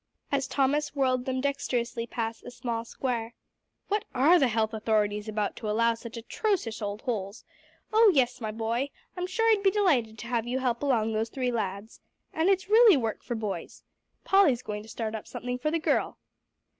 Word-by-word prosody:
as 275 Hz, -1 st, 0 dB
Thomas 290 Hz, +2 st, 0 dB
whirled 255 Hz, -2 st, +1 dB
them 260 Hz, 0 st, -1 dB
dexterously 245 Hz, -4 st, -2 dB
past 225 Hz, -1 st, -4 dB
a -, -, -8 dB
small 235 Hz, -2 st, -4 dB
square. 235 Hz, -2 st, -3 dB, 0.5 s
"What 415 Hz, 0 st, 0 dB
are 310 Hz, +8 st, +6 dB
the 270 Hz, -, +4 dB
health 220 Hz, -1 st, 0 dB
authorities 210 Hz, -1 st, 0 dB
about, 210 Hz, -1 st, -2 dB
to 215 Hz, -, -4 dB
allow 230 Hz, +2 st, +3 dB
such 230 Hz, 0 st, -9 dB
atrocious 240 Hz, -, -2 dB
old 205 Hz, 0 st, -4 dB
holes? 205 Hz, -3 st, -4 dB, 0.5 s
Oh, 445 Hz, 0 st, +7 dB
yes, 255 Hz, -6 st, +1 dB
my 220 Hz, -, -2 dB
boy, 230 Hz, +5 st, -2 dB, 0.3 s
I'm 360 Hz, 0 st, -3 dB
sure 450 Hz, +5 st, 0 dB
I'd 425 Hz, -2 st, +3 dB
be 395 Hz, -, +5 dB
delighted 295 Hz, -, +1 dB
to -, -, -8 dB
have 235 Hz, -1 st, -1 dB
you 250 Hz, +2 st, -1 dB
help 250 Hz, -2 st, -1 dB
along 230 Hz, -6 st, +1 dB
those 220 Hz, +1 st, -1 dB
three 250 Hz, 0 st, -1 dB
lads. 205 Hz, -1 st, -4 dB, 0.3 s
And 320 Hz, +4 st, +2 dB
it's 385 Hz, -1 st, +2 dB
really 435 Hz, -4 st, +7 dB
work 225 Hz, -4 st, -2 dB
for 240 Hz, -, -4 dB
boys. 215 Hz, -3 st, -5 dB, 0.4 s
Polly's 315 Hz, -11 st, +4 dB
going 210 Hz, 0 st, -4 dB
to 220 Hz, -, -14 dB
start 225 Hz, -1 st, -4 dB
up 220 Hz, -, -6 dB
something 250 Hz, 0 st, -4 dB
for 305 Hz, -, 0 dB
the 330 Hz, -, +1 dB
girl." 320 Hz, -, 0 dB
240 Hz, 190 wpm, -28 LUFS, 220-280 Hz, 0.5 s, Oh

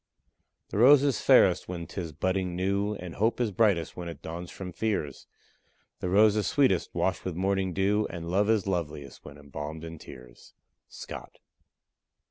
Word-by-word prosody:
The 100 Hz, -, -2 dB
rose 135 Hz, +4 st, +7 dB
is 140 Hz, -6 st, +1 dB
fairest -, -, +5 dB
when 85 Hz, -2 st, -5 dB
'tis 85 Hz, 0 st, -6 dB
budding 95 Hz, +3 st, -1 dB
new, 100 Hz, +3 st, 0 dB
And 90 Hz, -3 st, -8 dB
hope 110 Hz, +4 st, 0 dB
is 120 Hz, -4 st, 0 dB
brightest 100 Hz, -5 st, +1 dB
when 90 Hz, -1 st, -6 dB
it 85 Hz, -, -9 dB
dawns 85 Hz, +2 st, -6 dB
from 95 Hz, -2 st, -7 dB
fears; 90 Hz, -8 st, -3 dB, 0.7 s
The 90 Hz, -, -3 dB
rose 105 Hz, +3 st, +5 dB
is 105 Hz, -2 st, 0 dB
sweetest 130 Hz, -11 st, +2 dB
washed 95 Hz, -2 st, 0 dB
with 90 Hz, -3 st, -4 dB
morning 95 Hz, +1 st, 0 dB
dew, 100 Hz, +4 st, +1 dB
And 85 Hz, -2 st, -6 dB
love 100 Hz, +3 st, +2 dB
is 110 Hz, -3 st, +2 dB
loveliest 80 Hz, -7 st, -4 dB
when 70 Hz, 0 st, -11 dB
embalmed 75 Hz, +2 st, -7 dB
in 80 Hz, -1 st, -8 dB
tears. 60 Hz, -4 st, -14 dB, 0.3 s
SCOTT. -, -, -9 dB
95 Hz, 165 wpm, -28 LUFS, 85-105 Hz, 0.7 s, rose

